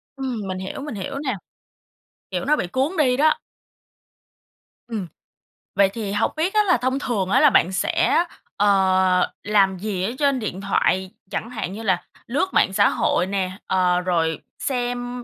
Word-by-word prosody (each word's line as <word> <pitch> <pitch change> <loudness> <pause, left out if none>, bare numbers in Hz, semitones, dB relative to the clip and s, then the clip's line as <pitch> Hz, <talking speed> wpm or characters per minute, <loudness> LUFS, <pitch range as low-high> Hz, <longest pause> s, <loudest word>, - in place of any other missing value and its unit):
Ừm, 260 -4 -3
mình 185 -1 -3
hiểu, 190 +8 -6
mình 290 -5 -6
hiểu 200 +7 -4
nè. 265 -5 -2 1.0
Kiểu - - -2
nó 300 +2 +4
bị 185 - -2
cuốn 270 - -1
đi 255 -5 +3
đó. 310 +2 +3 1.5
Ừm. 215 -6 -4 0.7
Vậy 195 0 +5
thì 215 -4 -4
hông 205 - +1
biết 350 +6 0
á 425 - +4
là 360 -9 +3
thông 260 +3 -1
thường 205 -9 -1
á - - +4
là 300 - +7
bạn 185 -6 +3
sẽ, 330 - +2 0.3
ờ, 190 -2 +3
làm 195 -2 +3
gì 195 -2 -3
ở 210 - -1
trên 280 -3 +2
điện 195 -4 -4
thoại? 190 -1 +1 0.2
Chẳng 230 - -3
hạn 215 -6 -4
như 220 +3 -7
là 185 -5 +1 0.2
lướt 285 +10 -1
mạng 190 - +3
xã 200 +1 +4
hội 180 - +1
nè, 190 -2 -1 0.2
ờ, 180 -1 +2
rồi 165 -3 0 0.2
xem, 245 -1 -2
215 Hz, 175 wpm, -22 LUFS, 190-265 Hz, 1.5 s, là